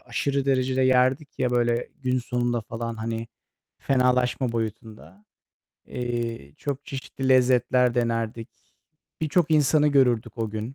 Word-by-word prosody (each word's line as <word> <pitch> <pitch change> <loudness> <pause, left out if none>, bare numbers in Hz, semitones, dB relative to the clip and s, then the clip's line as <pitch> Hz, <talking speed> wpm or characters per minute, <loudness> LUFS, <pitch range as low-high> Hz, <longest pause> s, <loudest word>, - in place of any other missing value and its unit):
aşırı 135 +3 -2
derecede 130 -1 +1
yerdik, 130 +3 +2
ya, 125 -1 +1
böyle, 120 -1 +1
gün 130 0 +1
sonunda 120 -1 -1
falan, 115 +1 -5
hani, 115 +1 -4 0.5
fenalaşma 125 -1 +1
boyutunda. 110 -4 -6 0.6
Eee, 115 - -4
çok 140 0 -4
çeşitli 135 -1 -5
lezzetler 125 -1 +3
denerdik. 115 -1 -2 0.7
Birçok 160 +1 +1
insanı 150 0 +4
görürdük 125 -5 +2
o 110 -1 -2
gün. 110 +5 -5
125 Hz, 115 wpm, -25 LUFS, 115-130 Hz, 0.7 s, insanı